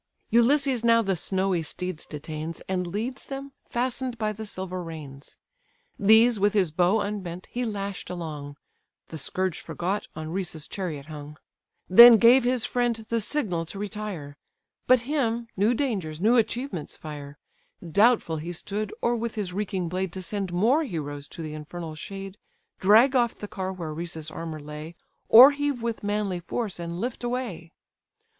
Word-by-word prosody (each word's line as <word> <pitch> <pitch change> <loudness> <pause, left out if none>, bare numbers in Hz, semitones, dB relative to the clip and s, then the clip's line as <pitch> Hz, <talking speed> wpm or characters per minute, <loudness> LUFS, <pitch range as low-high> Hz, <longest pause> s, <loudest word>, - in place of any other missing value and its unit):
Ulysses 255 +1 +3
now 230 0 +5
the 195 -2 0
snowy 190 0 0
steeds 180 +1 -5
detains, 155 +2 -6
And 180 -1 -1
leads 225 +8 -4
them, 275 0 -6 0.2
fasten'd 250 0 -1
by 215 -1 -1
the 220 +1 -7
silver 185 -2 -4
reins; 150 -5 -9 0.6
These, 220 +2 +6
with 205 +1 +3
his 190 -6 +2
bow 180 +6 +3
unbent, 185 -4 -5
he 245 - -2
lash'd 200 -3 -4
along; 150 -5 -6 0.5
(The 160 - -6
scourge 185 +3 -1
forgot, 190 +4 -3
on 155 0 -6
Rhesus' 175 -4 -3
chariot 160 -8 -5
hung;) 150 -1 -9 0.5
Then 235 +5 +10
gave 240 +4 +6
his 245 -1 +1
friend 245 -1 +1
the 230 -1 +1
signal 205 - -1
to 195 - -7
retire; 200 -8 -5 0.5
But 255 -1 +6
him, 240 -4 -1
new 210 +5 +2
dangers, 195 - -2
new 220 +6 +4
achievements 230 - -1
fire; 145 -2 -8 0.5
Doubtful 200 -2 +3
he 170 +3 -5
stood, 205 +4 -4
or 240 0 +2
with 235 -1 -3
his 200 -5 -3
reeking 190 -3 -2
blade 185 +1 -2
To 190 - -6
send 195 -1 -3
more 230 - +3
heroes 145 - -5
to 165 - -8
the 155 -1 -5
infernal 155 +2 -7
shade, 195 +5 -8 0.4
Drag 225 +8 +6
off 240 -2 +2
the 210 - -7
car 190 -2 -4
where 170 -5 -5
Rhesus' 160 -1 -5
armour 160 -1 -6
lay, 150 +3 -8 0.3
Or 255 +5 +10
heave 285 -4 -2
with 230 -1 -2
manly 205 -3 -1
force, 200 +2 -4
and 170 0 -5
lift 245 +3 -4
away. 240 -9 -4
195 Hz, 160 wpm, -26 LUFS, 165-230 Hz, 0.6 s, Then